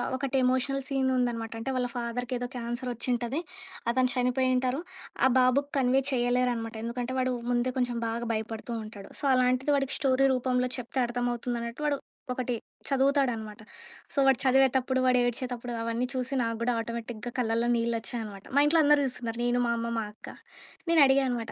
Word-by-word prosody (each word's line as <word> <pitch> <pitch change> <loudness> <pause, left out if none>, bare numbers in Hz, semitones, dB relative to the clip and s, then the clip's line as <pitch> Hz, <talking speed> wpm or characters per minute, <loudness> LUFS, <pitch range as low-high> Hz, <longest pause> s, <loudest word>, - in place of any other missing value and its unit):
ఒకటి 270 0 -1
emotional 260 +2 +1
scene 270 -1 +1
ఉందనమాట. 230 -2 -1
అంటే 265 +4 -3
వాళ్ళ 245 -1 0
ఫాదర్‌‌ 240 0 -3
కేదో 245 0 -2
'క్యాన్సర్' 240 +1 -3
ఒచ్చి 240 +2 -5
ఉంటది. 240 +6 -2 0.5
అతను 255 0 +2
చనిపోయింటారు. 255 +2 +1 0.4
ఆ! - - +6
బాబుకి 255 +3 +3
కన్వే 260 +1 +3
చేయలేరనమాట. 245 -2 0
ఎందుకంటే 240 +2 -3
వాడు 255 0 +1 0.2
ముందే 240 +1 +1
కొంచెం 245 -1 0
బాగా 235 +1 -3
భయపడుతూ 225 +2 -4
ఉంటాడు. 205 -2 -10
సో, - - -17
అలాంటిది 255 +3 +2
వాడికి 275 -1 -1
స్టోరీ 270 0 +3
రూపంలో 250 0 0
చెప్తే 250 +2 -4
అర్థమవుతుందన్నట్టు. 240 +1 -3
వాడు 285 -1 +1 0.4
ఒకటి 250 -1 -2 0.3
చదువుతాడనమాట. 265 -6 +1 0.5
సో, - - -11
వాడు 265 -3 +5
చదివేతప్పుడు, 260 0 +3
వాడు 250 0 +4
ఏడ్చేతప్పుడు 245 0 -3
అవన్నీ 230 +2 -1
చూసి 260 +1 -2
నాకు 230 -1 -1
కూడా 245 - +2
ఆటోమేటిక్‌గా 230 0 -5
కళ్ళల్లో 230 0 +1
నీళ్లొచ్చాయి 230 0 -2
అనమాట. 200 -2 -9
మా - - +6
ఇంట్లో 320 +2 +4
అందరూ 295 0 +5
జూస్తున్నారు. 235 -2 -4
నేను, 245 0 +2
మా 235 - +1
అమ్మ, 230 0 -2
మా 225 - 0
అక్క. 220 - -14 0.6
నేను 335 -1 +5
అడిగా 270 +1 +4
అనమాట 235 -3 -3
245 Hz, 165 wpm, -28 LUFS, 235-260 Hz, 0.6 s, ఆ